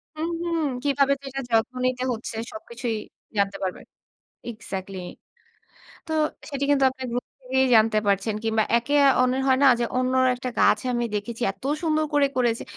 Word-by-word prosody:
হুম, 315 +2 -2
হুম। 335 -1 -1 0.2
কিভাবে 280 -1 +3
সেটার 270 0 -5
যত্ন 225 +2 +2
নিতে 255 0 0
হচ্ছে 225 0 -6 0.2
সবকিছুই 235 +1 -4 0.4
জানতে 200 0 +1
পারবে। 185 - -3 0.7
এক্সাক্টলি। 195 -3 -6 1.1
তো 320 - -3 0.4
সেটি 280 -1 -3
কিন্তু 280 -1 +3
আপনি 260 0 -9
গ্রুপ 245 +1 -2
থেকেই 265 0 +1
জানতে 220 0 +4
পারছেন 200 +2 +1
কিংবা 220 -1 +2
একে 240 +5 -3 0.3
অন্যর 255 +1 +2
হয় 260 -1 +4
না - - +8
যে, - - +1
অন্য 255 0 +1 0.2
একটা 255 0 -4
গাছে 210 +4 +4
আমি 240 0 0
দেখেছি। 220 +3 -4
এত 195 - -24 0.2
সুন্দর 310 -1 +1
করে 285 -1 +4
করেছে। 235 -2 +1
250 Hz, 160 wpm, -24 LUFS, 220-270 Hz, 1.1 s, না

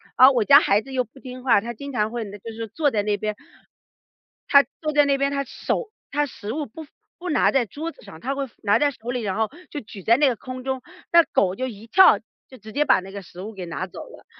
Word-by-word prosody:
而 260 +2 +8
我 240 -5 +1
家 280 +4 +9
孩 205 -4 +3
子 270 - -11
又 255 -1 +1
不 245 +4 -18
听 255 -1 -9
话， 245 -5 +5
他 235 +4 -5
经 280 +5 -8
常 220 -4 0
会 235 -1 -3 0.2
就 225 +3 -8
是 225 0 -5
坐 295 +4 +1
在 205 -3 0
那 205 -1 0
边。 210 +1 -3 1.1
他 280 -1 +8 0.2
坐 305 -1 -2
在 295 0 +5
那 280 -1 +2
边， 275 +1 +1
他 275 0 -1
手 430 - -3 0.2
他 295 +1 +1
食 215 -4 -7
物 300 -1 -2
不 315 +8 -10 0.3
不 360 +1 -6
拿 - - +3
在 265 -3 +2
桌 310 - -6
子 - - -20
上， - - -12
他 270 +3 -3
会 275 0 -2
放 - - -26
拿 205 -1 +4
在 290 -1 +3
手 240 -2 -10
里， 250 0 -1
然 200 -4 -2
后 220 -1 +1 0.2
就 295 - -4
举 205 -4 -11
在 230 - +5
那 295 - +4
个 255 - +1
空 255 +3 -8
中。 265 -1 -2 0.3
那 340 0 +7
狗 185 -9 +1
就 260 +5 -2
一 225 -1 -10
跳， 380 +9 +7 0.3
就 260 - -13
直 220 -1 -12
接 295 +6 +1
把 - - +5
那 190 +1 -10
个 200 0 -7
食 175 +1 -11
物 215 +3 -7
给 185 -3 -7
拿 175 +3 -4
走 - - -10
了。 - - -15
250 Hz, 290 characters per minute, -23 LUFS, 215-280 Hz, 1.1 s, 家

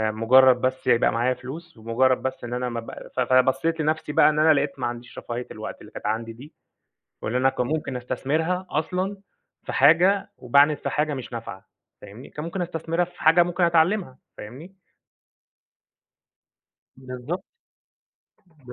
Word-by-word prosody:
مجرد 125 +3 +5
بس 130 0 -2
يبقى 120 - +4
معايا 120 +2 +1
فلوس، 135 +6 -10
مجرد 120 +3 +2
بس 130 - -4
إن 120 - -5
أنا 125 0 -2
ما 120 -1 -4
بق 115 - -9
ف - - -3
فبصيت 130 +6 +2
لنفسي 155 0 -1
بقى 150 - +5
إن 150 - 0
أنا 155 +1 +6
لقيت 140 -1 -1
ما - - -1
عنديش 120 0 -8
رفاهية 120 +1 -6
الوقت - - -8
اللي - - -13
كانت - - -9
عندي 115 +1 -2
دي، 135 +7 -14 0.7
واللي 120 +3 -1
أنا 135 +1 +3
ممكن 135 +1 -2
أستثمرها 160 +9 -2
أصلًا 185 +5 -2 0.5
في - - -6
حاجة، 180 +7 +4
وباعند 140 +4 +4
في - - -4
حاجة 150 0 0
مش 130 -3 -7
نافعة 115 -5 -8 0.3
فاهمني؟ 105 +6 -12
كان 150 - -7
ممكن 175 +2 -4
أستثمرها 165 +1 -1
في 180 - -17
حاجة 165 +2 +6
ممكن 175 +1 -1
أتعلمها 170 -3 +2 0.2
فاهمني؟ 140 - -10 2.2
بالضبط 130 +8 -6 1.2
ب 125 - -9
135 Hz, 155 wpm, -24 LUFS, 125-165 Hz, 2.2 s, أنا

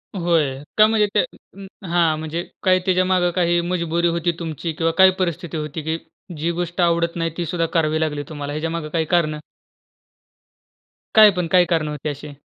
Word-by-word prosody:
होय, 165 -7 +1 0.2
का 215 - +8
म्हणजे 215 -1 +2
ते - - +4 0.7
हां 170 -2 +2
म्हणजे 160 +2 -4 0.2
काय 185 -1 +4
त्याच्यामागे 185 -1 +2
काही 175 -1 +2
मजबुरी 170 -1 -1
होती 170 0 0
तुमची 165 0 -4
किंवा 165 +1 0
काय 190 0 +8
परिस्थिती 170 -2 -2
होती 150 +1 -4
की 160 +1 -2 0.4
जी 165 +3 -1
गोष्ट 175 +1 -3
आवडत 170 -1 +1
नाही, 165 -1 -1
ती 175 - -2
सुद्धा 165 +1 -1
करावी 155 -2 +1
लागली 150 -2 -1
तुम्हाला 145 -2 -5
ह्याच्यामागे 160 0 -3
काही 160 0 -1
कारणं? 155 -2 +1 1.8
काय 215 -1 +9
पण, 180 -3 -2
काय 180 -1 +5
कारणं 165 -3 0
होती 150 0 -4
अशी? 145 0 -8
170 Hz, 170 wpm, -21 LUFS, 155-175 Hz, 1.8 s, काय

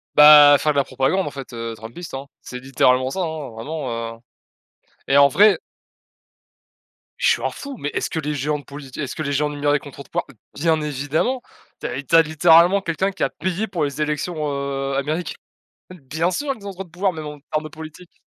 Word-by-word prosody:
Bah, 150 -1 +9
faire 155 - +2
de - - -3
la 140 - +4
propagande 135 +9 0
en - - -4
fait, 135 -2 -9
heu, 115 0 -5
Trumpiste, 115 +11 -9
hein. 135 +1 -5 0.2
C'est 125 - -8
littéralement 130 0 +2
ça, 190 - -4
hein, 160 -5 -4
vraiment, 115 -2 -5
heu - - -20 0.9
et 135 - +3
en 140 0 +7
vrai 200 +4 +5 1.6
je - - +3
suis - - 0
un - - +1
fou, 280 -2 -8
mais 145 - -3
est-ce - - -2
que 160 - -2
les 150 -1 -3
géants 150 +2 -1
de - - -13
polit 140 -1 -10
est-ce 140 -4 -4
que 155 - -3
les 140 - -2
géants 150 +1 +1
numériques 145 0 0
ont - - -9
trop 140 +2 -10
de - - -23
poids? - - -2 0.3
Bien 160 +1 +1
évidemment. 150 - -1 0.4
Tu - - -3
as 135 +3 -4
tu 155 - +1
as 165 - +9
littéralement 165 +4 +5
quelqu'un 190 +2 -1
qui 195 - -4
a - - +2
payé 185 +4 -2
pour 175 -6 -2
les 140 +1 -4
élections, 150 +3 -2 0.2
heu, 140 -1 -3
américaines. 155 +5 -2 0.6
Bien 160 0 -2
sûr 285 +8 -2
qu'ils 205 -6 -11
ont 200 - -5
trop 190 +1 -6
de 180 - -19
pouvoir, 185 +3 -1
même 155 -2 -7
en 150 0 -8
termes 155 - 0
de 155 - -7
politique. 160 +3 -12
150 Hz, 220 wpm, -21 LUFS, 140-170 Hz, 1.6 s, Bah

